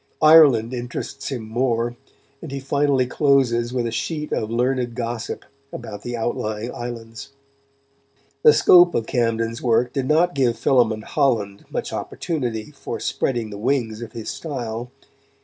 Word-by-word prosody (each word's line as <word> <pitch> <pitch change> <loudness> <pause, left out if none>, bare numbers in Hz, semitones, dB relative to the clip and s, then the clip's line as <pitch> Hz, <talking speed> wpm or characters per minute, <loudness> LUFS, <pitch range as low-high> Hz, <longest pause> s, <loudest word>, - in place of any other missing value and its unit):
Ireland 140 -7 +7
interests 125 +3 -5
him 125 -5 -4
more, 120 0 0 0.5
and 160 - -8
he 140 - -4
finally 140 -1 +1
closes 125 -3 +2
with 125 -2 -1
a 115 - -2
sheet 150 +6 -3
of 110 - -1
learned 125 0 0
gossip 115 -1 -4 0.3
about 105 0 -7
the 120 +1 -4
outlying 110 0 -3
islands. 115 0 -7 1.1
The 150 - +8
scope 175 +3 +6
of 115 - 0
Camden's 115 -1 -1
work 125 0 +2
did 135 -2 -1
not 170 +4 +3
give 125 -4 +1
Philémon 115 -5 +2
Holland 110 -10 0
much - - -4
opportunity 120 -10 -3
for - - -6
spreading 120 -4 -2
the 100 - -7
wings 115 -2 -1
of 115 -2 -8
his 115 -2 -5
style. 120 -6 -5
120 Hz, 145 wpm, -22 LUFS, 115-135 Hz, 1.1 s, The